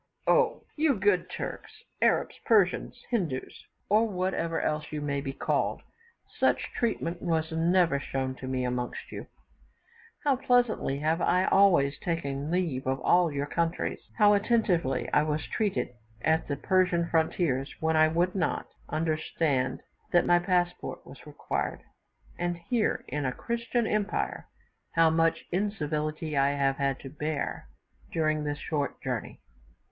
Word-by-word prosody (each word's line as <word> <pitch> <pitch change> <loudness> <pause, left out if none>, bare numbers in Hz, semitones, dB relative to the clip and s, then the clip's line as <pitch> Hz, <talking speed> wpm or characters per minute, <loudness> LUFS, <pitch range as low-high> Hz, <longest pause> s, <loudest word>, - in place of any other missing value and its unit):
Oh! 485 -2 +3
you 300 -3 +3
good 195 -3 +2
Turks, - - -5 0.3
Arabs, - - +3
Persians, 220 +2 +2
Hindoos, 165 - -3 0.2
or 215 +3 +4
whatever 180 -3 -1
else 150 0 -2
you 155 - -3
may 140 -1 -2
be 135 -1 -4
called, - - -1 0.6
such - - +2
treatment 205 -7 -1
was 160 -1 0
never 165 -2 +3
shown 135 -2 -3
to 130 - -7
me 130 -1 -1
amongst 125 0 -3
you! - - -7 1.0
How 280 -3 +3
pleasantly 245 - +2
have 160 +3 +1
I 180 +1 +3
always 170 -8 +4
taken 145 -4 -2
leave 160 -7 -1
of 135 0 0
all 175 -2 +4
your 140 0 -2
countries; 165 +3 -1 0.2
how 210 -2 +6
attentively 200 - +1
I - - +5
was 150 0 -1
treated 210 -2 -1 0.3
at 160 +1 +2
the 140 - -1
Persian 180 +1 +2
frontiers, 160 -4 +1
when 160 0 +1
I 155 0 +6
would 175 +3 +1
not 185 -4 -1 0.2
understand 155 -4 0 0.3
that 175 - +4
my 175 0 +5
passport 180 -1 -1
was - - -13
required, - - -3 0.6
and 175 0 -1
here, 220 +6 -1
in 150 0 -2
a 130 - 0
Christian 235 - -2
empire, 210 -1 -1 0.5
how 165 -1 +5
much 165 0 +2
incivility 155 -5 -2
have 140 -1 +2
I - - -1
had 135 -1 0
to 135 - -8
bear 150 -1 -3 0.4
during 155 -2 +1
this 145 0 -2
short 145 -3 -2
journey! - - -4
165 Hz, 140 wpm, -28 LUFS, 145-185 Hz, 1.0 s, how